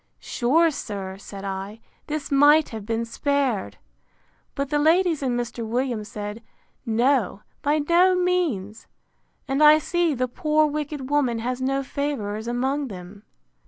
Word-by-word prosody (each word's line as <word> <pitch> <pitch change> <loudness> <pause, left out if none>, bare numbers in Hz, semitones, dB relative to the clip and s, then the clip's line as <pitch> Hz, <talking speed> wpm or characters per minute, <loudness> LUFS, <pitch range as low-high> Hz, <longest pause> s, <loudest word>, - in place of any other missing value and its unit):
Sure, 320 +7 +2
sir, 195 -8 -5
said 200 0 -9
I, 195 +3 -5 0.3
this 300 -1 -4
might 290 +2 +5
have 220 -3 -8
been 230 0 -1
spared! 265 -3 -1 0.8
But 280 0 -3
the 295 - +2
ladies 330 +1 +3
and 250 -3 0
Mr. 240 -1 -4
Williams 235 -1 -2
said, 210 +1 -6 0.5
No, 230 -3 +1 0.2
by 295 +1 +2
no 360 +2 +5
means! 325 - -1 0.6
And 270 +2 0
I 300 0 +8
see 335 0 0
the 255 0 0
poor 305 +5 +1
wicked 295 -2 -4
woman 265 -5 +2
has 250 +3 -3
no 270 +1 0
favourers 235 -7 -3
among 265 +4 -1
them. 195 0 -10
260 Hz, 140 wpm, -24 LUFS, 220-295 Hz, 0.8 s, I